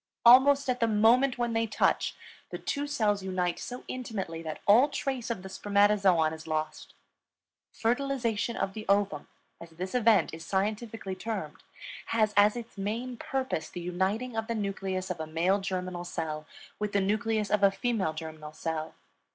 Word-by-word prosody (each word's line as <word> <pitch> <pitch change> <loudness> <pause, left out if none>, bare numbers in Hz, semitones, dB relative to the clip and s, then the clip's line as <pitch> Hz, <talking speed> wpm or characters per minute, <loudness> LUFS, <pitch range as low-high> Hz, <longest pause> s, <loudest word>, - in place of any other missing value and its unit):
Almost 270 +4 +7
at 250 -1 0
the 230 - +3
moment 235 +5 +4
when 240 -1 -1
they 225 0 +1
touch, 215 - +1 0.3
the - - -5
two 285 0 -3
cells 210 -8 +1
unite 185 -2 -1
so 250 0 -7
intimately 200 -10 -4
that 155 -2 -6
all 240 +8 +6
trace 270 -3 -3
of 215 -6 -3
the - - -7
spermatozoon 195 -4 +3
is 160 0 -9
lost. 155 0 -3 0.8
Fertilization 235 -2 -1
of 195 - -1
the 215 +1 -7
ovum, 200 -7 +1 0.3
as 170 - -10
this 180 +3 -6
event 230 -7 +3
is 160 0 -7
scientifically 210 +1 -2
termed, 190 -6 -5 0.5
has 215 -2 +2
as 205 +2 +5
its 230 -4 -8
main 230 +6 -3
purpose 260 -10 -3
the 175 - -7
uniting 190 +8 -1
of 225 0 -2
the 230 - -2
nucleus 195 -3 -3
of 180 - -4
a 160 - -4
male 175 +5 +1
germinal 185 -2 -3
cell 155 -3 -4 0.3
with 210 -1 -2
the 200 - +3
nucleus 215 +1 0
of 210 -1 +2
the 200 - +7
female 195 -5 -1
germinal 155 -1 -8
cell. 160 0 -4
205 Hz, 165 wpm, -29 LUFS, 180-230 Hz, 0.8 s, Almost